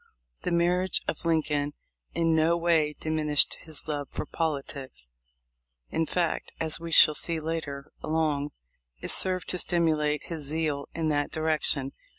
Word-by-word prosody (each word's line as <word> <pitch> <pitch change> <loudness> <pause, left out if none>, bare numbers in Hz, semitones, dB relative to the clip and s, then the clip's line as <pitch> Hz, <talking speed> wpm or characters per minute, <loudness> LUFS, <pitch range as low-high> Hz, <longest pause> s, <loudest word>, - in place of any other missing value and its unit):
The - - -2
marriage 180 +2 +3
of - - -3
Lincoln 150 -3 +1 0.4
in 165 0 +2
no 160 +2 +3
way 165 -3 +2
diminished 155 -2 +2
his 160 -1 -5
love 145 -2 -3
for - - -4
politics; 140 - -4 0.8
in 165 - 0
fact, 175 0 -1
as 160 0 -2
we 170 0 -6
shall 155 -1 +8
see 165 +2 -1
later 155 -3 -4
along, 155 -2 0 0.5
it - - -1
served 185 -1 +2
to 180 - -1
stimulate 155 -4 +1
his 165 -2 -6
zeal 145 -1 -2
in 160 -1 0
that 145 -1 0
direc 155 -1 0
tion. 135 -2 +1
155 Hz, 150 wpm, -27 LUFS, 150-165 Hz, 0.8 s, shall